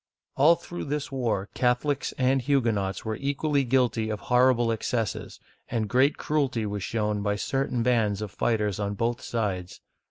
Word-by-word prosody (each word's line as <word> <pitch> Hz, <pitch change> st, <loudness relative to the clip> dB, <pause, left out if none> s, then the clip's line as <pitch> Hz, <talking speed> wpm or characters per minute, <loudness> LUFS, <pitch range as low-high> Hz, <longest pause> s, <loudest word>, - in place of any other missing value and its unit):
All 155 Hz, +5 st, +6 dB
through 175 Hz, +1 st, -7 dB
this 145 Hz, 0 st, -3 dB
war 115 Hz, -7 st, -1 dB
Catholics 130 Hz, +3 st, 0 dB
and 130 Hz, +1 st, +2 dB
Huguenots 115 Hz, -9 st, 0 dB
were 110 Hz, 0 st, -2 dB
equally 140 Hz, +1 st, 0 dB
guilty 120 Hz, -3 st, +1 dB
of 105 Hz, -1 st, -3 dB
horrible 125 Hz, -1 st, +3 dB
excesses, 115 Hz, -1 st, -2 dB, 0.3 s
and 115 Hz, -3 st, -1 dB
great 130 Hz, +6 st, +3 dB
cruelty 135 Hz, -7 st, 0 dB
was 100 Hz, -1 st, -3 dB
shown 105 Hz, 0 st, -1 dB
by 105 Hz, 0 st, 0 dB
certain 130 Hz, +2 st, -1 dB
bands 110 Hz, -5 st, +2 dB
of 105 Hz, -, -6 dB
fighters 105 Hz, -1 st, 0 dB
on 100 Hz, 0 st, -2 dB
both 115 Hz, +3 st, -1 dB
sides. 95 Hz, -6 st, -3 dB
120 Hz, 155 wpm, -26 LUFS, 105-135 Hz, 0.3 s, All